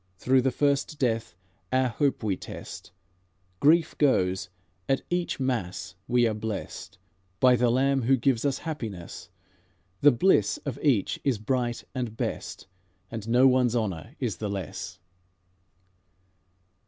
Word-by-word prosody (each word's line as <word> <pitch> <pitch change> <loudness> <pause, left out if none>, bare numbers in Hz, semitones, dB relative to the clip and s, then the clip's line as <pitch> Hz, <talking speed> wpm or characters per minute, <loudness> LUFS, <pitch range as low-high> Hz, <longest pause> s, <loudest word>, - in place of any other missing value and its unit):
Through 130 +5 +3
the 130 - +2
first 140 +3 0
death 115 -8 -1 0.4
our 130 0 +2
hope 135 +1 0
we 100 -3 +1
test; - - -9 0.7
Grief 160 +2 +4
goes; 95 -10 +2 0.4
at 135 - +1
each 175 -3 -1
mass 120 -12 -2
we 120 0 +3
are 110 - 0
blest 105 -3 -6 0.4
By 125 +2 +6
the 120 0 +2
Lamb 135 +2 +2
Who 130 +3 +3
gives 120 -1 +1
us 140 -2 +1
happiness; 110 - -6 0.7
The 145 - +7
bliss 120 - +3
of 140 -1 -4
each 130 -10 +1
is 135 -5 +1
bright 120 +2 -1
and 120 -4 -4
best, - - -4 0.5
And 115 -1 -6
no 125 +3 +5
one's 125 -2 +3
honour 110 - -3
is 120 -7 -2
the 105 - -3
less." 95 -5 -5
125 Hz, 135 wpm, -27 LUFS, 110-135 Hz, 0.7 s, The